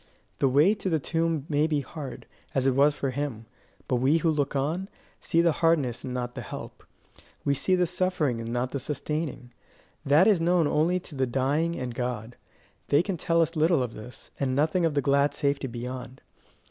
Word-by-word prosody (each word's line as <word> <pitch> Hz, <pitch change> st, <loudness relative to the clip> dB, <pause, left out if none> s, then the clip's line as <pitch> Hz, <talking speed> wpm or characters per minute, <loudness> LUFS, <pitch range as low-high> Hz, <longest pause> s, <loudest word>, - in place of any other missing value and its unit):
The 135 Hz, -, +3 dB
way 150 Hz, +10 st, +5 dB
to 200 Hz, -3 st, -3 dB
the 160 Hz, -, +2 dB
tomb 165 Hz, 0 st, -1 dB
may 150 Hz, 0 st, +2 dB
be 150 Hz, -2 st, 0 dB
hard, 140 Hz, 0 st, -8 dB, 0.3 s
as 135 Hz, -1 st, +1 dB
it 135 Hz, -, +4 dB
was 145 Hz, +3 st, +4 dB
for 135 Hz, -2 st, -2 dB
him; 130 Hz, -5 st, -4 dB, 0.4 s
but 125 Hz, -, +1 dB
we 135 Hz, +6 st, +3 dB
who 165 Hz, 0 st, +2 dB
look 145 Hz, -2 st, -1 dB
on, 160 Hz, +8 st, -1 dB, 0.3 s
see 165 Hz, -, +2 dB
the 170 Hz, -1 st, +4 dB
hardness 150 Hz, -8 st, +2 dB
and 130 Hz, -, -5 dB
not 125 Hz, -1 st, -3 dB
the -, -, -6 dB
help; -, -, -8 dB, 0.6 s
we 140 Hz, -, +3 dB
see 185 Hz, +7 st, +2 dB
the 180 Hz, -1 st, +2 dB
suffering 175 Hz, -7 st, 0 dB
but 115 Hz, -, -5 dB
not 120 Hz, +2 st, -2 dB
the 140 Hz, -, -2 dB
sustaining: 150 Hz, -1 st, -4 dB, 0.5 s
that 150 Hz, +5 st, +5 dB
is 200 Hz, -6 st, +4 dB
known 175 Hz, 0 st, +3 dB
only 160 Hz, +5 st, +2 dB
to 165 Hz, -, -10 dB
the 130 Hz, -2 st, 0 dB
dying 145 Hz, +7 st, 0 dB
and 125 Hz, -4 st, -4 dB
God. 120 Hz, -1 st, -4 dB, 0.5 s
They 145 Hz, +4 st, +4 dB
can 195 Hz, 0 st, -2 dB
tell 170 Hz, 0 st, +1 dB
us 165 Hz, +2 st, -3 dB
little 160 Hz, -2 st, +3 dB
of 120 Hz, -2 st, -5 dB
this, 110 Hz, +4 st, -10 dB
and 130 Hz, -2 st, 0 dB
nothing 160 Hz, +5 st, +2 dB
of 160 Hz, -3 st, 0 dB
the 145 Hz, -, +1 dB
glad 140 Hz, 0 st, +2 dB
safety 140 Hz, -2 st, 0 dB
beyond. 125 Hz, +1 st, -7 dB
145 Hz, 200 wpm, -27 LUFS, 130-165 Hz, 0.6 s, way